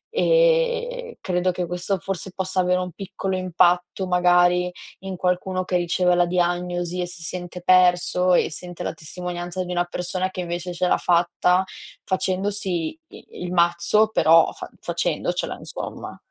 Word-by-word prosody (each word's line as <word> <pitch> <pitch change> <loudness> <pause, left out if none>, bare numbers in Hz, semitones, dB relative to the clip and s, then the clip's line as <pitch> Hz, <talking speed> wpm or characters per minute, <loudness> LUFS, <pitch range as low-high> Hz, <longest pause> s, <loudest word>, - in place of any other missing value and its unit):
E - - +2
credo 180 0 0
che 180 0 -3
questo 180 +3 -1
forse 190 0 -5
possa 190 0 -1
avere 180 0 +2
un 180 0 -4
piccolo 190 +1 -4
impatto, 180 0 +1
magari, 180 0 +3 0.3
in 190 0 -6
qualcuno 185 +1 -1
che 180 - -3
riceve 180 +1 +1
la 175 0 +3
diagnosi 175 0 -1
e 175 - -2
si 175 -1 -7
sente 175 +1 -6
perso 180 0 +4
e - - +2
sente 175 +2 -7
la - - -3
testimonianza 175 +2 -5
di 180 - -6
una 175 0 0
persona 180 +1 -2
che 185 - -5
invece 175 0 -4
ce 180 +1 0
l'ha - - +3
fatta, 180 +1 +2 0.4
facendosi 190 -2 0 0.2
i - - -14 0.2
il 180 - -4
mazzo, 175 +5 +3
però, 165 -5 +5
fa - - -9
facendocela, - - -2
insomma. - - -7
180 Hz, 150 wpm, -23 LUFS, 175-185 Hz, 0.4 s, però